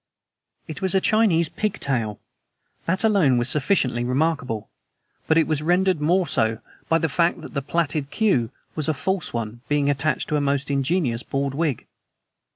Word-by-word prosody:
It 155 +4 -7
was 190 0 +1
a - - +5
Chinese 190 -6 +3
pigtail. 135 - -2 0.7
That 185 +5 +1
alone 190 - +4
was 120 +1 0
sufficiently 130 -4 +1
remarkable; 125 -4 -1 0.6
but 160 - +3
it 165 - +4
was 155 -1 -1
rendered 180 +1 +2
more 180 +4 +2
so 110 -7 +1 0.3
by 165 - +4
the 165 - 0
fact 170 +4 +1
that - - -10
the 140 - -1
plaited 150 -1 -1
queue 145 - +1 0.2
was 155 -1 -2
a 155 - 0
false 190 +6 -2
one 115 0 -5
being 145 -1 +2
attached 150 +2 -1
to 150 - 0
a - - 0
most 140 0 0
ingenious 140 -3 0
bald 135 +1 -2
wig. 150 -4 -1
150 Hz, 165 wpm, -23 LUFS, 130-170 Hz, 0.7 s, a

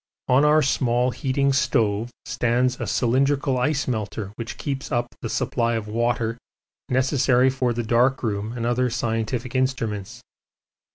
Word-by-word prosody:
On 130 +3 +4
our 150 +1 +5
small 125 -2 +1
heating 140 +2 0
stove 115 -4 +1 0.2
stands 125 +1 0
a - - -2
cylindrical 135 +2 +1
ice 145 +3 0
melter 110 -4 -3
which 115 0 -6
keeps 140 -1 -4
up 120 -2 -1
the 115 - -4
supply 115 +1 0
of 110 -2 -3
water 115 +1 -1 0.5
necessary 130 0 +3
for 130 -2 0
the 120 0 -2
dark 125 +4 +2
room 105 -1 -2
and 120 -1 -3
other 125 +1 +1
scientific 115 +1 -2
instruments. 115 -7 -2
120 Hz, 145 wpm, -23 LUFS, 115-130 Hz, 0.5 s, our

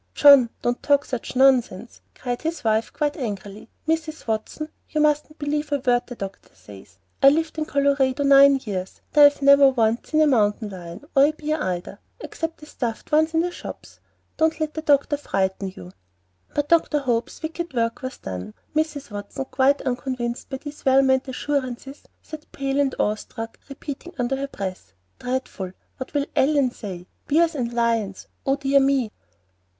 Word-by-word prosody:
"John, 280 -5 +8
don't 240 0 0
talk 285 0 +3
such 250 0 -5
nonsense," 250 -5 +2
cried 245 -1 -4
his 325 +1 -3
wife, 220 0 +1
quite 295 -1 -1
angrily. 205 -5 -6 0.2
"Mrs. 320 -1 -2
Watson, 225 +7 -3 0.2
you 305 - -1
mustn't 300 +1 +1
believe 295 0 -2
a 285 - +2
word 245 -2 +1
the 245 - -8
doctor 195 -3 -8
says. 95 -3 -15 0.2
I've 275 +1 +8
lived 320 0 -2
in 310 - -1
Colorado 280 -1 +1
nine 275 0 +7
years; 190 -4 -5
and 295 - +7
I've 285 -1 +3
never 280 0 +7
once 230 -3 0
seen 310 0 +3
a - - +6
mountain 215 -5 +2
lion, 180 +4 -9
or 275 0 +7
a 300 - +2
bear 305 0 -3
either, 180 -1 -3 0.2
except 325 0 -5
the - - -10
stuffed 235 -6 -5
ones 315 +2 +3
in 325 - +4
the 355 +1 -1
shops. - - -10 0.4
Don't 320 0 +2
let 310 -1 -2
the 315 - -4
doctor 290 -1 +2
frighten 195 -7 -1
you." 90 0 -10 0.6
But 290 0 0
Dr. 330 -2 +3
Hope's 245 0 -2
wicked 335 +1 -4
work 230 -1 0
was 260 0 -5
done. 95 +2 -7 0.2
Mrs. 300 -5 -1
Watson, 205 +6 -5
quite 275 +2 +3
unconvinced 245 -1 -3
by 265 - -4
these 290 +2 -10
well 270 0 +5
meant 265 0 +2
assurances, 270 0 -3 0.2
sat 310 -1 -10
pale 275 0 -2
and 275 -2 +1
awe 210 - +2
struck, 225 +1 -8
repeating 290 +5 -8
under 250 +1 0
her 275 +1 -3
breath, 190 - -6 0.3
"Dreadful! 250 -7 -4 0.2
What 260 +2 -8
will 285 -1 +1
Ellen 275 -2 +3
say? 185 -7 -8 0.2
Bears 330 +3 +3
and 245 -5 -2
lions! 230 -4 -1 0.2
Oh, 270 - +3
dear 275 0 +3
me!" 270 -5 +2
270 Hz, 175 wpm, -23 LUFS, 230-295 Hz, 0.6 s, John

